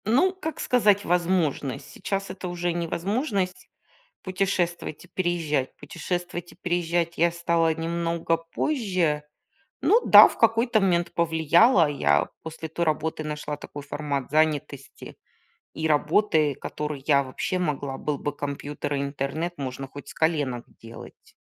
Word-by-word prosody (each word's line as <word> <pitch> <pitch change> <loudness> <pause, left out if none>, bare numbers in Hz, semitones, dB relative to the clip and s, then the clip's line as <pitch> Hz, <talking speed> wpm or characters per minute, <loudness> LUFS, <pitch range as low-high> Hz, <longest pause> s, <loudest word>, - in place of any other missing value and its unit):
Ну, 270 - +3
как 320 -5 -6
сказать, 205 -5 +3
возможность. 170 -6 0
Сейчас 195 0 -3
это 185 - -6
уже 175 0 -2
не 170 0 -2
возможность 195 - -2 0.5
путешествовать 185 -4 -2
и - - -17
переезжать. 170 -7 -1
Путешествовать 175 +3 -5
и - - -17
переезжать 175 -1 -1
я 170 +1 +3
стала 170 -1 +1
немного 165 0 -1
позже. 175 - -1 0.6
Ну 450 - +5
да, - - +10
в - - -10
какой-то 230 0 +3
момент 175 -3 +1
повлияла. 170 - +4
Я 75 - +2
после 160 0 -7
той 170 +2 -1
работы 155 0 -1
нашла 150 -1 -4
такой 145 - -9
формат 140 -2 -3
занятости 150 -3 -1 0.6
и 160 - -2
работы, 155 -1 +2
которую 150 +1 -5
я 140 -2 +4
вообще 135 +7 -3
могла. 145 -6 -2
Был 150 -1 -2
бы 145 +1 -4
компьютер 145 0 -4
и - - -1
интернет, 140 +5 -3
можно 135 0 -5
хоть 145 +2 -11
с - - -9
коленок 145 -7 0 0.2
делать. 115 0 -13
165 Hz, 135 wpm, -25 LUFS, 145-180 Hz, 0.6 s, да